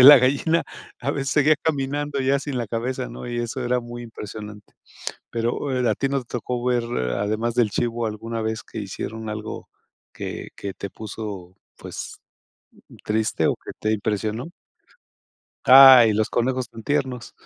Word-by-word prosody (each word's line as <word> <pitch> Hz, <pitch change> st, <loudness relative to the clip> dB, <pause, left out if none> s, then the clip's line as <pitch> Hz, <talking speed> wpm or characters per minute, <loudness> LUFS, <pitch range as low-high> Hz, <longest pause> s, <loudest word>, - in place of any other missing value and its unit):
de 125 Hz, -, +9 dB
la 145 Hz, -1 st, +12 dB
gallina 140 Hz, +6 st, +2 dB, 0.4 s
a 135 Hz, +3 st, -1 dB
veces 135 Hz, -1 st, -2 dB
seguía 150 Hz, +1 st, +4 dB
caminando 145 Hz, -1 st, -1 dB
ya 135 Hz, +1 st, +2 dB
sin 140 Hz, -2 st, -4 dB
la 120 Hz, -, -2 dB
cabeza, 125 Hz, +3 st, -2 dB
¿no? -, -, -8 dB
Y 120 Hz, 0 st, -3 dB
eso 120 Hz, +2 st, -3 dB
era 125 Hz, 0 st, +1 dB
muy 120 Hz, 0 st, -8 dB
impresionante, 105 Hz, -2 st, -9 dB, 0.6 s
pero, 120 Hz, +3 st, -1 dB
eh, 125 Hz, -1 st, +1 dB
¿a -, -, +2 dB
ti 135 Hz, -, -1 dB
nos 135 Hz, -2 st, -2 dB
tocó 120 Hz, +1 st, -3 dB
ver, 125 Hz, -1 st, +2 dB
eh, 65 Hz, -, -1 dB
además 110 Hz, +3 st, -1 dB
del 120 Hz, -4 st, +3 dB
chivo, 115 Hz, +2 st, -1 dB
alguna 115 Hz, +2 st, -4 dB
vez 110 Hz, 0 st, -2 dB
que -, -, -9 dB
hicieron 110 Hz, +3 st, -5 dB
algo 105 Hz, 0 st, -6 dB, 0.4 s
que -, -, -6 dB
que 100 Hz, -, -5 dB
te 100 Hz, -, -6 dB
puso, 100 Hz, -4 st, -7 dB, 0.2 s
pues -, -, -7 dB, 0.9 s
triste 110 Hz, 0 st, +1 dB
o -, -, +1 dB
que -, -, -9 dB
te 110 Hz, -, 0 dB
impresionó? 110 Hz, +4 st, -2 dB, 1.2 s
Ay, 130 Hz, -3 st, +10 dB
los 110 Hz, +1 st, +1 dB
conejos 125 Hz, 0 st, 0 dB
tan 115 Hz, -, -10 dB
tiernos. 130 Hz, -2 st, -1 dB
120 Hz, 165 wpm, -23 LUFS, 110-130 Hz, 1.2 s, la